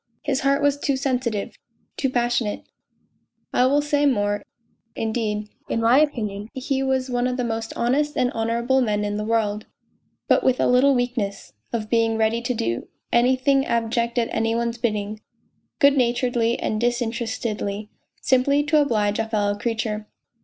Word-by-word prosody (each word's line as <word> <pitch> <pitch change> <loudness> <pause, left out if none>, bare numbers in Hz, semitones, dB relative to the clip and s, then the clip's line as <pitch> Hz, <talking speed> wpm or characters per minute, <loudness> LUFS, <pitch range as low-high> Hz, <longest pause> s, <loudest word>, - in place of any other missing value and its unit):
His 280 -2 0
heart 275 +1 +1
was 285 0 +2
too 280 -2 0
sensitive, 250 -6 -2 0.4
too 270 - 0
passionate! 240 -3 0 0.9
I 250 - +4
will 290 +2 +2
say 290 -1 +2
more, 205 -5 +1 0.5
indeed: 215 -2 -2 0.2
in - - 0
my 230 +4 +5
opinion, 215 -8 -1
he 265 +1 -1
was 265 -1 0
one 245 0 +1
of 250 0 -2
the 250 - -1
most 225 -1 -3
honest 290 +5 0
and 250 0 +2
honourable 235 +4 +1
men 210 -3 0
in 205 0 -2
the 210 - -2
world, 215 -1 -1 0.6
but - - +3
with 255 -1 +2
a - - +3
little 260 +3 +4
weakness: 245 -5 -2 0.2
of 220 -2 -2
being 225 -1 +2
ready 225 +1 +1
to 245 +1 -1
do 115 - -2 0.3
anything 260 +3 +3
abject 235 0 -1
at 235 -1 +1
any 225 0 0
one's 235 0 -2
bidding, 215 -2 -2 0.6
good 280 -2 +5
naturedly 240 -2 +1
and 215 0 -2
disinterestedly, 225 -3 -2 0.3
simply 275 +3 +3
to 300 0 +3
oblige 210 -7 +1
a 225 0 -1
fellow 205 -2 +1
creature. 215 -1 -3
235 Hz, 160 wpm, -23 LUFS, 220-260 Hz, 0.9 s, my